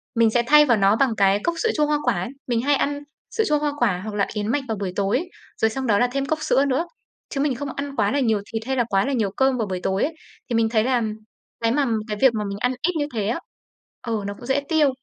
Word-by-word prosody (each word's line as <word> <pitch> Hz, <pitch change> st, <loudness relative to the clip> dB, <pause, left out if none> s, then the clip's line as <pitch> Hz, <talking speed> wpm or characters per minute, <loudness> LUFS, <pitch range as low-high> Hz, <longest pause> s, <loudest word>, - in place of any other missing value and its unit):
Mình 230 Hz, -1 st, +4 dB
sẽ 240 Hz, 0 st, +2 dB
thay 300 Hz, +2 st, +7 dB
vào 235 Hz, -4 st, +3 dB
nó 200 Hz, +1 st, +4 dB
bằng 235 Hz, -1 st, +2 dB
cái 195 Hz, 0 st, +4 dB
cốc 340 Hz, -, 0 dB
sữa 455 Hz, -, +2 dB
chua 300 Hz, -, +3 dB
hoa 300 Hz, 0 st, +1 dB
quả 250 Hz, -, +2 dB
ấy. 185 Hz, -, -4 dB, 0.2 s
Mình 235 Hz, -2 st, +1 dB
hay 285 Hz, +3 st, +3 dB
ăn 285 Hz, +1 st, -1 dB, 0.4 s
sữa 445 Hz, -, +2 dB
chua 300 Hz, -1 st, +2 dB
hoa 295 Hz, -1 st, 0 dB
quả 200 Hz, -7 st, +1 dB
hoặc 215 Hz, -1 st, -5 dB
là 200 Hz, -, +2 dB
yến 210 Hz, -1 st, -2 dB
mạch 275 Hz, +5 st, 0 dB
vào 220 Hz, -2 st, -2 dB
buổi 190 Hz, -3 st, -3 dB
tối, 200 Hz, -, +1 dB, 0.4 s
rồi 220 Hz, -, +4 dB
xong 260 Hz, +3 st, -4 dB
đó 205 Hz, -2 st, +3 dB
là 245 Hz, -, +3 dB
thêm 275 Hz, +1 st, -1 dB
cốc 310 Hz, +3 st, -1 dB
sữa 285 Hz, -2 st, +2 dB
nữa, 280 Hz, +5 st, 0 dB, 0.4 s
chứ 275 Hz, -, -2 dB
mình 280 Hz, -3 st, +1 dB
không 280 Hz, +3 st, -5 dB
ăn 280 Hz, 0 st, -5 dB
quá 205 Hz, -4 st, +1 dB
là 285 Hz, -, +1 dB
nhiều 220 Hz, -6 st, +1 dB
thịt 225 Hz, -, -2 dB
hay 265 Hz, -, -1 dB
là 240 Hz, -, +3 dB
quá 195 Hz, 0 st, +2 dB
là 275 Hz, -, -1 dB
nhiều 215 Hz, -6 st, 0 dB
cơm 265 Hz, -1 st, +3 dB
vào 220 Hz, -3 st, -1 dB
buổi 185 Hz, -1 st, -3 dB
tối 190 Hz, +1 st, 0 dB
ấy. 320 Hz, -, -1 dB, 0.4 s
Thì 235 Hz, -, 0 dB
mình 225 Hz, -1 st, +2 dB
thấy 220 Hz, -1 st, +2 dB
là 250 Hz, 0 st, +1 dB, 0.6 s
cái 230 Hz, 0 st, +2 dB
mà 285 Hz, +2 st, +2 dB, 0.2 s
cái 210 Hz, -2 st, -3 dB
việc 265 Hz, -3 st, +6 dB
mà 215 Hz, -1 st, -2 dB
mình 200 Hz, -, -4 dB
ăn 250 Hz, +3 st, +1 dB
ít 360 Hz, +3 st, +1 dB
như 295 Hz, -, 0 dB
thế 210 Hz, -3 st, -1 dB
á, 235 Hz, +8 st, -1 dB, 0.7 s
ừ, 220 Hz, -3 st, -1 dB
nó 200 Hz, -, -3 dB
cũng 245 Hz, -, -10 dB
dễ 265 Hz, +3 st, +1 dB
tiêu. 315 Hz, -3 st, +4 dB
245 Hz, 290 wpm, -23 LUFS, 215-280 Hz, 0.7 s, thay